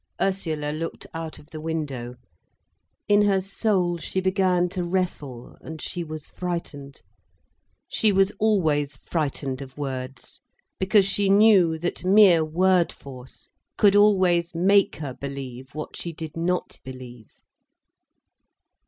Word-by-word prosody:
Ursula 160 -6 -1
looked 165 +2 -5
out 165 -1 -6
of 150 - -17
the 155 - -7
window. 140 -7 -4 0.9
In 205 0 +5
her 200 -2 +3
soul 190 -3 0
she 175 +4 -3
began 185 -1 +2
to 180 0 -3
wrestle, 170 -9 -3
and 160 0 -8
she 175 - -4
was 155 -2 -7
frightened. 155 -6 -6 0.8
She 215 - +1
was 195 0 +3
always 155 -10 +1
frightened 140 -3 -3
of 135 0 -10
words, 130 -2 -6 0.4
because 195 +1 +4
she 200 0 +1
knew 195 -5 +5
that 175 +3 -4
mere 185 -3 +6
word 180 +2 +2
force 130 -2 -12 0.3
could 205 -1 +5
always 185 -5 +3
make 195 +3 +3
her 145 -4 -6
believe 130 -1 -8
what 155 - -6
she 170 - -5
did 160 -1 -8
not 175 +2 -2
believe. 125 -3 -11
165 Hz, 125 wpm, -24 LUFS, 145-190 Hz, 0.9 s, mere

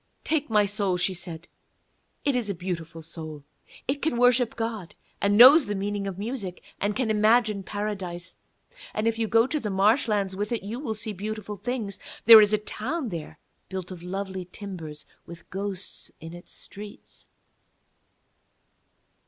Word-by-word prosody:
'Take 305 -4 0
my 210 -2 +4
soul,' 200 -2 0
she 185 +1 +1
said; 175 -1 -8 0.8
'it 280 -2 +2
is 240 -4 0
a 200 - -1
beautiful 165 -2 -5
soul. 155 -2 -8 0.4
It 280 +2 -1
can 295 -6 0
worship 245 -1 +4
God, 225 -6 -4 0.3
and 200 0 +3
knows 265 +3 +10
the 205 - -1
meaning 200 0 -2
of 190 -2 -5
music 205 -4 -5 0.2
and 205 +1 0
can 245 -4 0
imagine 215 -1 +3
Paradise. 190 -4 -4 0.6
And 215 +1 0
if 230 0 0
you 225 - +1
go 225 +1 +5
to 300 +3 -1
the 215 - -3
marshlands 205 -1 +2
with 205 +3 -3
it 235 - -1
you 220 +5 -5
will 230 -6 -3
see 215 0 -3
beautiful 210 +1 -5
things; 220 -1 -4 0.3
there 225 -1 +12
is 210 0 +4
an 215 -1 +2
old - - -26
town 265 +4 -3
there 165 -5 -6 0.3
built 190 -1 -5
of 180 -2 -8
lovely 190 0 -4
timbers, 165 -8 -7 0.2
with 170 0 -11
ghosts 195 0 -5
in 165 +1 -9
its 175 0 -11
streets.' 205 +1 -11
205 Hz, 165 wpm, -26 LUFS, 185-225 Hz, 0.8 s, there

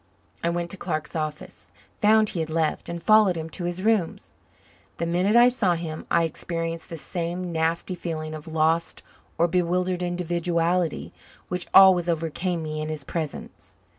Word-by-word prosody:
I 170 - +2
went 170 0 -2
to 195 - -4
Clark's 155 -4 -4
office, 155 -1 -5 0.3
found 215 0 +5
he 175 - -4
had 160 -1 -2
left, 160 -1 -1
and 170 -1 -5
followed 215 -3 +5
him 160 0 -5
to 175 - -5
his 175 +2 -3
rooms. 215 -6 0 0.6
The - - -1
minute 180 +5 +1
I 240 +1 +8
saw 205 -8 +2
him 160 -2 -6
I 170 - +3
experienced 165 0 -4
the 165 - -6
same 175 +2 -4
nasty 165 +3 -1
feeling 160 -3 -5
of 155 0 -8
lost 160 +1 0 0.3
or 170 - +3
bewildered 180 +1 0
individuality 175 -1 -1 0.4
which 180 0 -1
always 185 -3 +7
overcame 165 +1 -2
me 155 0 -4
in 155 - -4
his 155 -2 -5
presence. 155 +1 -6
170 Hz, 165 wpm, -25 LUFS, 160-180 Hz, 0.6 s, I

